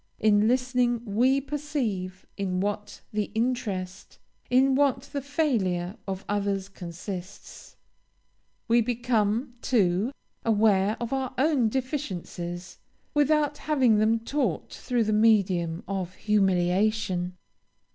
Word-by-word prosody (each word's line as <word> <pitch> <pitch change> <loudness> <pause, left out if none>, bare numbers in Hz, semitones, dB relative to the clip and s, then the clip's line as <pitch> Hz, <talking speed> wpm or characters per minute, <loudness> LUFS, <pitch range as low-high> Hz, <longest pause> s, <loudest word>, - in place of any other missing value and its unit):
In 210 0 +4
listening 245 -1 +1
we 245 +6 +3
perceive 270 -11 -3
in 185 -2 -2
what 205 +1 -3
the 210 -1 0
interest, 210 -6 -2 0.3
in 265 +2 +4
what 270 -1 +2
the 280 +1 -5
failure 220 - 0
of 190 0 -4
others 200 -1 -1
consists; 180 +1 -8 0.9
we 235 +1 +4
become, 235 0 0
too, 205 -1 +2 0.3
aware 210 -1 +3
of 235 +2 -3
our 265 -1 -2
own 265 -4 +3
deficiencies, 185 - -4 0.3
without 295 0 +2
having 260 -8 +3
them 220 +1 +3
taught 230 - -2
through 245 -2 0
the 215 0 0
medium 190 -6 +2
of 185 -2 -3
humiliation. 190 -1 +1
215 Hz, 105 wpm, -27 LUFS, 190-255 Hz, 0.9 s, In